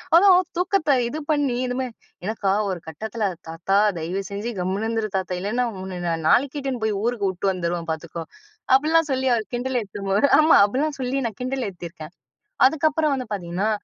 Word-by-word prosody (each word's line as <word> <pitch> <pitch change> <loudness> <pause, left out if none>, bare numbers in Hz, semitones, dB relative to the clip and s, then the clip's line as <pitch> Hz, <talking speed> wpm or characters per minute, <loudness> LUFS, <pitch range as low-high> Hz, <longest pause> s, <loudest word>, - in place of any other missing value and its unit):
அதான் 365 0 +7 0.2
தூக்கத்த 360 -6 +2
இது 300 +6 -4
பண்ணி 285 -4 +1
இதுமே, 255 +1 -2 0.4
எனக்கா 200 -2 0 0.2
ஒரு 185 -2 -3
கட்டத்துல, 220 +7 -4 0.2
"தாத்தா, 195 +4 0 0.2
தயவு 180 +5 -3
செஞ்சு 205 +4 -3
கம்முனு 190 +4 -1
இருந்துரு 225 -2 -1
தாத்தா! 185 -1 -2
இல்லைன்னா 230 +6 0 0.2
உன்ன 185 -2 -6
நான் 165 -1 -2
நாளைக்கே 280 +3 +3
இட்டுன்னு 260 -4 -3
போயி 215 -2 0
ஊருக்கு 230 -5 0
உட்டு 185 +2 -3
வந்துருவேன். 170 -2 -3
பார்த்துக்கோ!" 165 +1 -5 0.5
அப்டிலாம் 310 +3 +3
சொல்லி, 265 0 0
அவர் 220 -2 -3
கிண்டல 250 +1 -1
ஏத்தம்போது, 200 +3 0
ஆமா 310 +1 +6
அப்டிலாம் 280 +7 -1
சொல்லி 255 +2 -1
நான் 215 - -9
கிண்டல் 255 -2 -2
ஏத்தியிருக்கேன். 170 -3 -9 0.5
அதுக்கப்புறம் 310 0 +1
வந்து 255 -1 -5
பார்த்தீங்கன்னா, 185 +2 -2
220 Hz, 165 wpm, -23 LUFS, 190-270 Hz, 0.5 s, அதான்